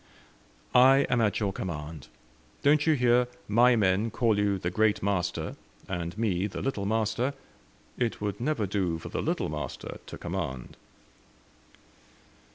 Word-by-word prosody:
"I 135 +2 +6
am 120 -2 +3
at 105 -3 +1
your 100 -3 -1
command. 80 -5 -6 0.6
Don't 150 +2 +4
you 160 - +6
hear 125 -1 +3 0.2
my 120 +4 +5
men 100 +1 +2
call 115 0 +1
you 100 -1 +1
the 90 -1 -3
'Great 110 +1 +2
Master,' 90 -3 -1 0.3
and 85 0 -4
me 100 -4 0
the 100 - -6
'Little 105 -7 -2
Master?' 110 +5 0 0.6
It 120 -2 -1
would 105 +1 -3
never 130 -5 0
do 95 -4 -1
for 80 - -8
the - - -2
'Little - - -1
Master' 75 -3 -6
to - - -8
command." 65 -1 -5
105 Hz, 145 wpm, -28 LUFS, 90-120 Hz, 0.6 s, I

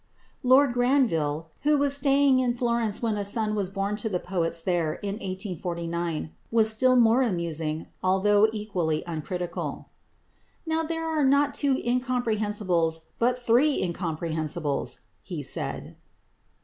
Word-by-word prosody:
Lord 260 0 +5
Granville, 165 - +1
who 300 0 +3
was 280 0 +2
staying 275 -1 +4
in 245 -2 +1
Florence 235 -3 -1
when 220 -2 0
a 205 - -2
son 215 +1 -1
was 200 -3 -1
born 200 +1 -2
to 220 +1 -2
the 185 - 0
poets 175 -2 -1
there 165 -2 0
in 200 0 -5
1849, 170 -4 -4 0.2
was 220 -1 +4
still 255 +4 +3
more 235 +1 +5
amusing 165 - -2 0.2
although 205 +3 +4
equally 185 -8 -2
uncritical. 175 +2 -5 0.8
"Now 320 0 0
there 325 0 -3
are 315 -2 0
not 280 +1 +3
two 280 -2 +1
incomprehensibles 215 -10 0 0.2
but 245 +1 0
three 265 +6 +4
incomprehensibles," 160 -4 -2 0.2
he - - -6
said. - - -2
210 Hz, 130 wpm, -26 LUFS, 170-250 Hz, 0.8 s, Lord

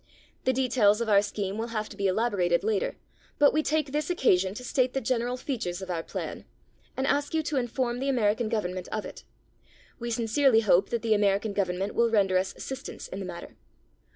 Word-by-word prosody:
The 260 - +4
details 240 -5 +3
of 235 -1 -1
our 200 -1 +6
scheme 200 0 -3
will 230 - -2
have 215 -2 -3
to - - -10
be 200 -1 0
elaborated 185 -4 +1
later, 215 -2 0 0.4
but 290 -1 +5
we 310 - +3
take 305 -2 0
this 300 +3 -1
occasion 195 - +2
to 250 - -7
state 255 0 +1
the 270 - 0
general 245 0 -1
features 220 -10 -3
of 190 -1 -6
our 170 -2 -1
plan, - - -6 0.5
and 265 - 0
ask 290 +3 0
you 315 - +1
to 295 -1 -2
inform 245 0 -1
the 275 +1 -1
American 225 -3 +1
Government 185 -5 -2
of 215 -1 -4
it. - - -9 0.8
We 235 0 -4
sincerely 230 +1 +3
hope 195 -3 +3
that 235 -1 -2
the 225 -1 +3
American 205 0 +1
Government 195 0 -1
will 235 0 +3
render 195 -4 +3
us 190 +1 -3
assistance 270 +1 -7
in 190 - -6
the 190 - -5
matter. 170 -1 -9
225 Hz, 205 wpm, -27 LUFS, 195-255 Hz, 0.8 s, our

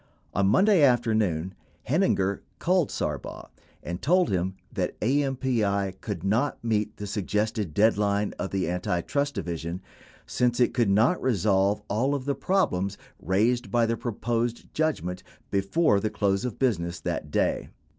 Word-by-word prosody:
On 100 0 +2
Monday 190 - +4
afternoon, 110 - +2 0.3
Heininger 120 - +1 0.2
called 180 -3 +2
Sarbaugh 75 -4 -4 0.3
and 85 +1 -5
told 180 +5 +3
him 95 0 -1 0.2
that - - -2
AMPI 120 -7 0
could 100 -6 -5
not 115 +9 +1
meet 110 -2 -1
the 105 - -5
Suggested 105 -1 -1
deadline 105 +1 +2
of 95 - -2
the 95 -4 -1
Antitrust 90 - -1
Division 85 +1 -4 0.5
since 120 0 0
it 125 - +3
could 120 -4 +2
not 110 - +3
resolve 100 -4 +2
all 130 +8 +1
of 130 -2 -4
the 140 - +1
problems 100 - 0 0.2
raised 115 +6 +1
by 120 -1 +3
the 115 +1 0
proposed 120 +1 -3
judgment 145 - -1 0.3
before 100 - +2
the 110 - -1
close 100 +1 0
of 125 - -4
business 85 -10 0
that 75 - -3
day. - - 0
105 Hz, 140 wpm, -26 LUFS, 95-125 Hz, 0.5 s, Monday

